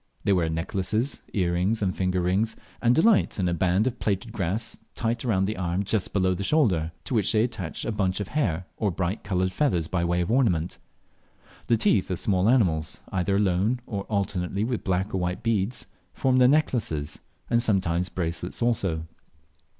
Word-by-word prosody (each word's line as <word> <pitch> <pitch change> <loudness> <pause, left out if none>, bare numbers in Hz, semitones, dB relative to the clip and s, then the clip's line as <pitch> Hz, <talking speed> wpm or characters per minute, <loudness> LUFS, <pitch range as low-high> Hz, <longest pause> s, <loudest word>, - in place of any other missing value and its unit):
They 100 - +3
wear 85 -3 +1
necklaces, 95 - -1
earrings, 95 +3 0
and 95 -2 0
finger 90 -1 0
rings, 95 +6 +1 0.3
and 120 +1 +4
delight 215 +5 +3
in 90 - +1
a 85 - +1
band 90 +4 +2
of 125 -2 -2
plaited 105 +2 -1
grass 100 +1 -2 0.2
tight 115 0 -1
round 95 -6 +1
the 105 +1 -3
arm 90 +1 -1
just 100 0 -1
below 95 -2 +2
the 95 +2 -4
shoulder, 95 - +2
to - - -5
which 110 -3 +2
they 110 -1 +3
attach 110 -9 -3
a - - -1
bunch 95 -3 0
of 105 - -4
hair 95 - -1
or 105 - +1
bright 95 +3 -2
coloured 95 -2 0
feathers 95 - +1
by 85 0 -1
way 85 +1 +1
of 90 - -1
ornament. 95 -10 +1 0.9
The 115 - +3
teeth 105 -3 +2
of 90 - -1
small 95 +2 +2
animals, 85 -11 +2
either 95 +1 0
alone, 100 +4 +1
or 100 -4 -4
alternately 100 -1 -1
with 120 0 -2
black 95 +1 -1
or 95 - 0
white 90 +4 -2
beads, 115 0 0 0.3
form 130 -1 +2
their 125 -1 +6
necklaces, 110 - 0 0.3
and 120 0 +2
sometimes 90 -5 +1
bracelets 85 -1 -3
also. 95 -9 0
95 Hz, 180 wpm, -26 LUFS, 90-115 Hz, 0.9 s, their